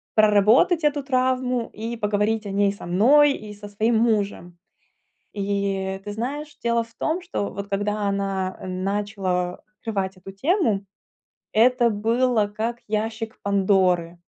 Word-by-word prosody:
проработать 215 Hz, -, +4 dB
эту 290 Hz, -1 st, +1 dB
травму 255 Hz, -2 st, 0 dB
и 230 Hz, +2 st, -5 dB
поговорить 210 Hz, +1 st, 0 dB
о 200 Hz, -, -4 dB
ней 200 Hz, 0 st, +2 dB
со 200 Hz, -, -10 dB
мной 270 Hz, +12 st, +5 dB
и 210 Hz, -5 st, -8 dB
со 205 Hz, 0 st, -10 dB
своим 220 Hz, +3 st, +1 dB
мужем. 205 Hz, -6 st, 0 dB, 0.8 s
И 195 Hz, -1 st, -2 dB
ты 205 Hz, -, -5 dB
знаешь, 280 Hz, +8 st, -5 dB
дело 235 Hz, 0 st, +2 dB
в 230 Hz, 0 st, -19 dB
том, 330 Hz, +4 st, -1 dB
что 345 Hz, -, -3 dB
вот 200 Hz, +1 st, -6 dB
когда 205 Hz, +1 st, -1 dB
она, 195 Hz, -1 st, -2 dB
э, -, -, -8 dB
начала 185 Hz, -1 st, -2 dB, 0.2 s
открывать 195 Hz, -4 st, -3 dB
эту 185 Hz, +1 st, -10 dB
тему, 225 Hz, -, +1 dB, 0.7 s
это 240 Hz, +1 st, +4 dB
было 225 Hz, +1 st, +1 dB
как 225 Hz, +3 st, -3 dB
ящик 220 Hz, +2 st, -3 dB
Пандоры. 185 Hz, -4 st, +2 dB
210 Hz, 140 wpm, -23 LUFS, 195-235 Hz, 0.8 s, мной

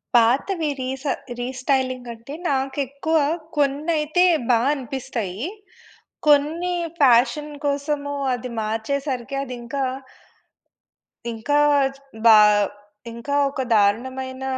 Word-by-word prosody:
పాతవి 285 Hz, -, +3 dB
రీస 265 Hz, +2 st, -4 dB, 0.4 s
రీస్టైలింగ్ 255 Hz, 0 st, -1 dB
అంటే 230 Hz, +5 st, -11 dB, 0.2 s
నాకు 270 Hz, 0 st, -1 dB
ఎక్కువ 300 Hz, +4 st, -1 dB, 0.4 s
కొన్నైతే 300 Hz, +4 st, +1 dB, 0.3 s
బా 235 Hz, -2 st, +5 dB
అనిపిస్తాయి. 245 Hz, -7 st, -5 dB, 0.9 s
కొన్ని 305 Hz, +5 st, +3 dB, 0.2 s
ఫ్యాషన్ 280 Hz, +3 st, +3 dB
కోసము 285 Hz, 0 st, -1 dB, 0.2 s
అది 245 Hz, +1 st, -5 dB
మార్చేసరికి 255 Hz, +4 st, -3 dB
అది 255 Hz, -2 st, -6 dB
ఇంకా 270 Hz, +4 st, -3 dB, 1.5 s
ఇంకా 235 Hz, +6 st, 0 dB, 0.7 s
బా 220 Hz, -2 st, +9 dB, 0.8 s
ఇంకా 235 Hz, +5 st, -4 dB, 0.2 s
ఒక 275 Hz, -, -5 dB
దారుణమైన 260 Hz, +6 st, 0 dB
265 Hz, 85 wpm, -22 LUFS, 240-290 Hz, 1.5 s, బా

